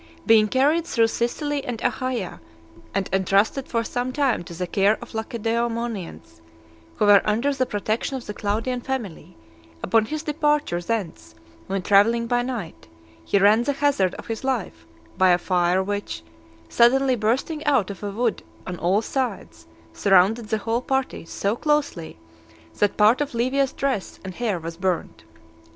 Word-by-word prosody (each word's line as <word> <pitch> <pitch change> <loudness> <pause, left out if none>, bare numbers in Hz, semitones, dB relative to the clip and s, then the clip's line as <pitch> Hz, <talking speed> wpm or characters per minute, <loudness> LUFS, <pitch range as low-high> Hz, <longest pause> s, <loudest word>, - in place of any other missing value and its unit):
Being 220 -2 +5
carried 295 +8 +2
through 230 -6 +2
Sicily 285 +5 -2
and 240 -3 -4
Achaia, 245 - -2 0.5
and 195 -1 -1
entrusted 195 +7 +2
for 230 -1 -1
some 245 +2 -3
time 270 -8 0
to 170 - -9
the 180 +2 -3
care 200 +4 +2
of - - -11
the - - -5
Lacedaemonians, 225 - -3 0.5
who - - +1
were 205 -1 +7
under 235 +7 +1
the 255 -2 -1
protection 215 +6 -2
of 255 - -9
the 210 - -5
Claudian 225 +5 -2
family, 240 - -5 0.5
upon 220 +3 +3
his 305 +6 -4
departure 295 - 0
thence 165 - -4 0.3
when 195 -1 -2
travelling 225 +4 +4
by 245 +1 +1
night, 240 - -6 0.4
he 200 - +1
ran 205 +3 +5
the 285 +4 0
hazard 275 -10 +1
of - - -9
his 225 +1 -5
life, 220 - -3 0.3
by 185 0 +5
a 175 - +5
fire 180 +1 +1
which, 200 - -4 0.4
suddenly 260 - +4
bursting 250 +8 -1
out 255 -10 +2
of 195 - -10
a 205 - -3
wood 225 +2 -1 0.2
on 180 -1 -6
all 190 +6 +1
sides, 260 0 -4 0.3
surrounded 200 +4 +3
the 220 - +1
whole 225 +3 -1
party 265 -8 -2
so 200 +5 -2
closely, 290 - -1 0.6
that 205 -1 +1
part 220 +6 +5
of 290 -4 -3
Livia's 260 +3 +1
dress 265 -8 -3
and 190 - -6
hair 220 -2 -1
was 165 0 -7
burnt. 180 - -2
225 Hz, 160 wpm, -23 LUFS, 195-255 Hz, 0.6 s, were